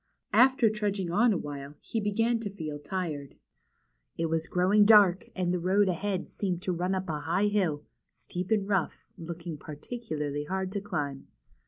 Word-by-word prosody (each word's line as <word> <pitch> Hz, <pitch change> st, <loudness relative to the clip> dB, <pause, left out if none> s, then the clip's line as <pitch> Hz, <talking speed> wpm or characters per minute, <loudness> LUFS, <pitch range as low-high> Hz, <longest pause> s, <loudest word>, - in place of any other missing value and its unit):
After 260 Hz, -2 st, +6 dB
trudging 205 Hz, -4 st, -2 dB
on 225 Hz, +6 st, +4 dB
a 195 Hz, -, +1 dB
while 145 Hz, -1 st, -7 dB
he 225 Hz, -, -3 dB
began 225 Hz, +3 st, +1 dB
to 220 Hz, -3 st, -4 dB
feel 155 Hz, -6 st, -6 dB
tired. 150 Hz, -5 st, -4 dB, 0.8 s
It 165 Hz, -, -1 dB
W'as 165 Hz, 0 st, 0 dB
growing 190 Hz, +4 st, +4 dB
dark, 205 Hz, -4 st, +6 dB
and 180 Hz, -1 st, 0 dB
the 180 Hz, -, 0 dB
road 190 Hz, +3 st, +3 dB
ahead 185 Hz, +1 st, -1 dB
seemed 180 Hz, -3 st, -3 dB
to 190 Hz, -, 0 dB
run 180 Hz, +2 st, -1 dB
up 190 Hz, 0 st, -3 dB
a 155 Hz, -2 st, -2 dB
high 170 Hz, +7 st, +1 dB
hill, 175 Hz, -8 st, 0 dB, 0.3 s
steep 180 Hz, +1 st, -6 dB
and 210 Hz, -3 st, +1 dB
rough, 195 Hz, -4 st, -1 dB
looking 170 Hz, -1 st, -6 dB
particularly 150 Hz, -3 st, -5 dB
hard 190 Hz, +3 st, -2 dB
to 200 Hz, 0 st, -2 dB
climb. 145 Hz, -9 st, -4 dB
185 Hz, 170 wpm, -29 LUFS, 160-205 Hz, 0.8 s, After